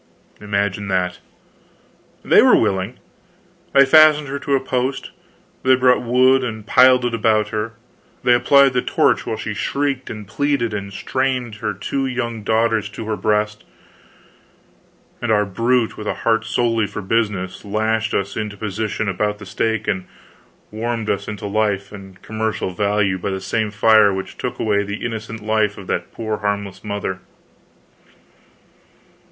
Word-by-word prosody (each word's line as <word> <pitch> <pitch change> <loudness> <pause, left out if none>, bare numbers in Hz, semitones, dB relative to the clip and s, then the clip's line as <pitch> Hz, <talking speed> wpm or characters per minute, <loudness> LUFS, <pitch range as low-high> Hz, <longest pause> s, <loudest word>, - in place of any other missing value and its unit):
Imagine 100 -1 -2
that! 90 -2 -1 1.1
They - - +6
were - - +6
willing. 95 +5 -1 0.8
They 140 0 +7
fastened 150 0 +6
her 140 +1 -3
to 140 - 0
a - - +2
post; 130 +1 -2 0.5
they 130 0 +5
brought 125 0 +3
wood 130 +2 +3
and 110 -3 -5
piled 125 +1 +5
it 120 - -1
about 110 -1 +2
her; 110 +1 -3 0.5
they 125 - +5
applied 140 +2 +5
the 125 - +1
torch - - +1
while - - -2
she - - -4
shrieked 140 -2 -2
and 105 -2 -7
pleaded 130 -1 0
and 100 -1 -5
strained 125 +1 -2
her 105 -1 -3
two 135 +7 -2
young 120 -3 -3
daughters 110 0 +1
to 105 +2 -8
her 110 0 -2
breast; 105 0 -1 1.6
and 120 - -1
our 105 -1 +3
brute, 115 +4 0
with 105 - -6
a - - -1
heart 115 -1 +2
solely 115 -1 +1
for 105 - -7
business, 95 -3 -1
lashed 110 +2 -1
us 100 0 -2
into 105 -1 -4
position 105 +1 -3
about 105 +2 -1
the 100 - -11
stake 110 +2 -2
and 95 -2 -2 0.6
warmed 115 0 -2
us 100 - -3
into 105 -1 -6
life 100 -1 -1
and 95 -2 -12
commercial 110 -3 -2
value 100 0 0
by 90 - -3
the 95 0 -3
same 110 +3 -1
fire 105 0 +5
which 95 0 -5
took - - -4
away 105 -2 +1
the 100 +2 -5
innocent 110 -1 -5
life 110 -1 +1
of 100 - -9
that 90 -1 -3
poor 110 -2 -3
harmless 100 -2 -3
mother. 100 -3 -4
110 Hz, 155 wpm, -20 LUFS, 100-120 Hz, 1.6 s, They